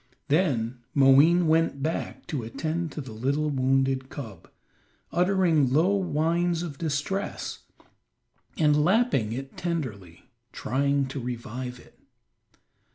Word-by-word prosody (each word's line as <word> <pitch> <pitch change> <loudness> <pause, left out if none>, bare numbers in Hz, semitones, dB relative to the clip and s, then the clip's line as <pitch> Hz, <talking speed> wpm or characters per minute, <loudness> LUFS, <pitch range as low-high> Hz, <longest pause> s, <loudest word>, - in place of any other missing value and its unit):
Then 130 -7 +1 0.2
Moween 145 +6 +6
went 160 -3 +2
back 160 +2 -3
to 145 -6 -3
attend 160 +8 -3
to 150 - -5
the 130 -4 -9
little 140 +7 -1
wounded 135 0 +1
cub, 110 -11 -9 0.6
uttering 175 -7 +2
low 170 +8 +3
whines 170 -1 0
of 145 -5 -7
distress, 165 +6 -3 1.0
and 150 -1 +3
lapping 185 - +2
it 135 +3 -6
tenderly, 120 - -5 0.2
trying 140 +2 0
to 135 - -5
revive 125 +1 -5
it. - - -20
145 Hz, 110 wpm, -26 LUFS, 130-165 Hz, 1.0 s, Moween